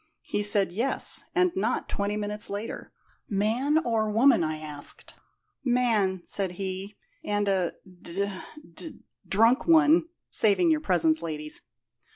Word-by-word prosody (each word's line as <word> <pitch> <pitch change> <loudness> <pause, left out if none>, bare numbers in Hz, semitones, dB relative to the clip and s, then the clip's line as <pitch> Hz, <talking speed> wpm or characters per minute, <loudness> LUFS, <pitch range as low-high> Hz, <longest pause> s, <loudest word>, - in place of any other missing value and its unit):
He - - -2
said, 205 -2 +3
'Yes; 235 +9 0
and 365 0 +3
not 380 - -1
twenty 205 +1 -2
minutes 210 +1 -2
later.' 205 +3 -6 0.4
'Man 225 +9 +1
or 225 -8 0
woman?' 230 -1 +4
I 155 0 -2
asked. 150 -2 -7 0.5
'Man,' 230 -7 +1
said 190 -3 -2
he, 190 +2 -5 0.3
'and 205 0 -1
a 190 -3 +1 0.3
d 195 +4 -2 0.5
d 315 - -7 0.3
drunk 225 - +3
one' 325 0 +5 0.2
saving 220 - +4
your 310 -1 +1
presence, 165 - +2
ladies. 150 -2 -2
205 Hz, 130 wpm, -27 LUFS, 190-245 Hz, 0.5 s, one